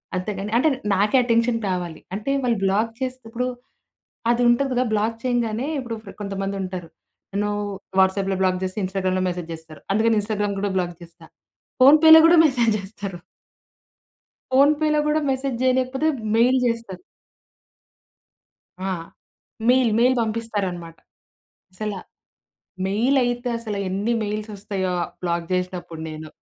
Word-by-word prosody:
అంతే 185 +3 -2
కానీ 205 +2 -4
అంటే 310 +5 +4 0.3
నాకే 210 +6 +3
అటెన్షన్ 230 0 +2
కావాలి. 175 -3 -3
అంటే 215 +7 -3
వాళ్ళు 235 -4 +1
బ్లాక్ 210 +4 +1
చేసేతప్పుడు, 250 -1 -3 0.8
అది 240 +1 +1
ఉంటది 270 +3 +2
కదా! 250 +1 +1
బ్లాక్ 220 +2 0
చేయంగానే 240 0 -1
ఇప్పుడు 240 -3 -5 0.3
కొంతమంది 195 0 -3
ఉంటారు. 180 -3 -6 0.4
నన్ను 205 +1 0 0.5
వాట్సాప్‌లో 190 0 +2
బ్లాక్ 185 -1 +1
జేస్తే 185 +2 -3
ఇన్‌స్టాగ్రామ్‌లో 185 -1 -1
మెసేజ్ 175 -2 -5
జేస్తారు 160 -1 -12
అందుకని 225 +2 +3
ఇన్‌స్టాగ్రామ్‌ 205 -1 -2
కూడా 200 -1 -1
బ్లాక్ 175 -1 -2
జేస్తా. 170 0 -14 0.5
ఫోన్‌పేలో 315 +4 +9
కూడా 340 +1 +6
మెసేజ్ 245 -6 +2
జేస్తరు. 195 -2 -7 1.3
ఫోన్‌పేలో 300 +3 +4
గూడా 305 +1 +2
మెసేజ్ 265 -1 -2
జేయలేకపోతే 260 +3 +1 0.3
మెయిల్ 250 +3 +4
జేస్తరు. 230 -5 -3 1.8
ఆ! - - -2 0.8
Mail 250 -2 +4
mail 250 +2 +4
పంపిస్తారన్నమాట! 205 -7 -3 0.8
అసలా, 205 0 -4 0.9
మెయిల్ 230 +8 +1
అయితే 245 0 -1
అసల 220 -3 -5
ఎన్ని 200 +5 -1
మెయిల్స్ 210 +1 -4
వస్తాయో 195 -2 -3 0.3
బ్లాక్ 170 -1 -2
జేసినప్పుడు 180 -2 -3
నేను. 155 0 -8
215 Hz, 125 wpm, -23 LUFS, 190-245 Hz, 1.8 s, ఫోన్‌పేలో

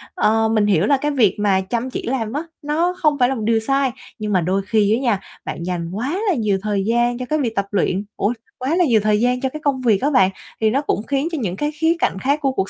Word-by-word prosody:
Ờ, 220 +1 +2
mình 215 -2 +2
hiểu 195 -4 +3
là 275 +5 +3
cái 295 +3 -1
việc 235 -9 +3
mà 195 -2 +2
chăm 235 +6 -3
chỉ - - -5
làm 230 -3 -2
á, 295 +3 -2 0.2
nó 330 +4 0
không 300 -2 +3
phải 245 0 +4
là 270 - -1
một 225 - -4
điều 225 0 +3
sai 270 +3 +1 0.3
nhưng 210 -1 -2
mà 185 - +3
đôi 185 +4 0
khi 215 -2 +3
á - - -1
nha, 235 -7 +1 0.3
bạn 170 - -5
dành 175 -2 -3
quá 255 - -2
là - - +3
nhiều 215 -6 +1
thời 205 -2 -1
gian 240 +2 +1
cho 255 - -4
cái 310 - +1
việc 235 -5 -1
tập 200 - 0
luyện 195 0 0
ủa, 205 +4 +1 0.2
quá 265 +6 -1
là 355 0 +3
nhiều 235 -7 +4
thời 210 -1 +2
gian 250 +2 +1
cho 265 - 0
cái 305 - -7
công 275 -2 +1
việc 220 -6 +2
á 285 - +2
bạn, 190 -9 +5 0.3
thì 220 - +4
nó 265 +6 +1
cũng 250 -7 -1
khiến 280 +2 0
cho 325 - -2
những 185 -5 -2
cái 295 +8 -2
khía 320 +2 +1
cạnh 190 - 0
khác 280 +7 +1
của 275 -2 +1
cuộc 195 -7 -2
235 Hz, 285 wpm, -20 LUFS, 205-275 Hz, 0.3 s, bạn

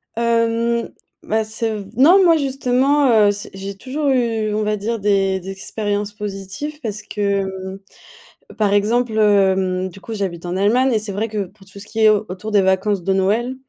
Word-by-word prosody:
Hem, 230 0 0 0.3
ben, 220 +1 0
c'est 220 +1 -2
v 205 -2 -6
non, 355 +9 +6
moi 335 -2 +5
justement, 270 +1 +1 0.2
heu, - - +4
c'est 205 0 -7
j'ai 195 +1 -6
toujours 275 +7 -3
eu, 230 -4 0
on 215 - 0
va 210 0 0
dire, 225 +2 -3
des 195 -1 +1
des 190 +1 -9
expériences 205 +1 -3
positives 210 +9 -6
parce 210 -2 -4
que, 195 -2 -3 0.8
par 205 -2 +2
exemple, 220 +3 +1
hem, 190 -3 +2
du 190 +2 -13
coup, 220 +5 -7
j'habite 185 -5 -4
en 175 - -3
Allemagne. 240 +7 +2
Et 220 - +3
c'est 210 -1 -4
vrai 215 +4 -2
que, 210 -2 -2
pour 195 +2 -20
tout 195 +1 -12
ce 205 - -10
qui 225 +1 -5
est 220 - +6
au 215 0 +2
autour 185 +4 -6
des 205 -2 +4
vacances 190 +1 +1
de 195 - +1
Noël, 215 +7 +1
210 Hz, 195 wpm, -19 LUFS, 195-230 Hz, 0.8 s, non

